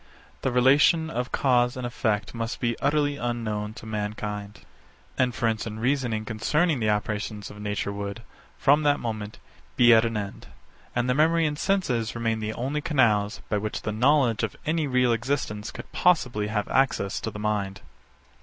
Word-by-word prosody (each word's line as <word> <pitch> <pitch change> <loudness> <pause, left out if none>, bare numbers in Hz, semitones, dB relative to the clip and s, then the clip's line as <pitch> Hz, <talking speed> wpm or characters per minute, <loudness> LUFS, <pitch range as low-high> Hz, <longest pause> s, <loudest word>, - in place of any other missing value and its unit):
The 135 - 0
relation 145 +6 +4
of 125 -4 -3
cause 125 -2 +2
and 125 - -4
effect 110 -4 -1
must 115 0 -4
be 120 -1 0
utterly 145 0 +1
unknown 110 -4 -3
to 115 - -10
mankind. 105 -1 -4 0.6
Inference 115 -3 0
and 110 0 -6
reasoning 120 -3 0
concerning 150 +8 +1
the 110 -2 +1
operations 105 0 -2
of 105 - -12
nature 105 -1 -2
would, 100 +2 -5 0.3
from 145 +2 +4
that 145 -1 +2
moment, 110 -3 -5 0.4
be 120 -1 +7
at 110 0 +6
an 115 -2 -1
end; 100 -2 -6 0.5
and 120 0 +1
the 125 - +3
memory 160 +4 +3
and 150 -1 -2
senses 125 - 0
remain 115 -1 -1
the 110 0 -3
only 135 +6 -2
canals, 115 -10 +2
by 105 - 0
which 105 +1 -4
the 110 - -2
knowledge 125 0 +3
of 110 -4 -2
any 155 -1 0
real 125 -2 +3
existence 115 -3 -2
could - - -10
possibly 125 -12 +2
have 105 -1 -1
access 130 -6 +1
to - - -3
the - - -8
mind. 100 -2 -2
115 Hz, 170 wpm, -26 LUFS, 105-135 Hz, 0.6 s, be